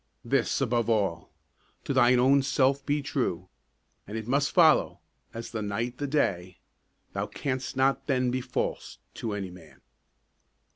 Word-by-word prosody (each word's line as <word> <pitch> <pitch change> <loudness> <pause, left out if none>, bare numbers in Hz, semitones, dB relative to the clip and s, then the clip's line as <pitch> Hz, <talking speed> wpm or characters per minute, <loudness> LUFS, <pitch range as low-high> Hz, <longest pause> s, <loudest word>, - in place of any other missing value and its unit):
This - - +1
above 120 -1 +1
all: 100 -7 0 0.5
To - - -2
thine 125 -1 +5
own 135 +3 +5
self 135 0 +1
be 145 0 -1
true, 95 - -2 0.6
And 105 +2 -5
it 110 0 -6
must 140 +3 +1
follow, 165 -4 +4 0.3
as 115 0 -7
the 110 - -3
night 115 +4 -3
the 145 - -2
day, 95 - -1 0.6
Thou - - -2
canst 130 -1 -4
not 135 +1 +1
then 130 -3 +1
be 130 +1 -1
false - - -3 0.2
to 110 -3 -4
any 100 -3 -4
man. 85 -3 -15
125 Hz, 150 wpm, -28 LUFS, 105-135 Hz, 0.6 s, thine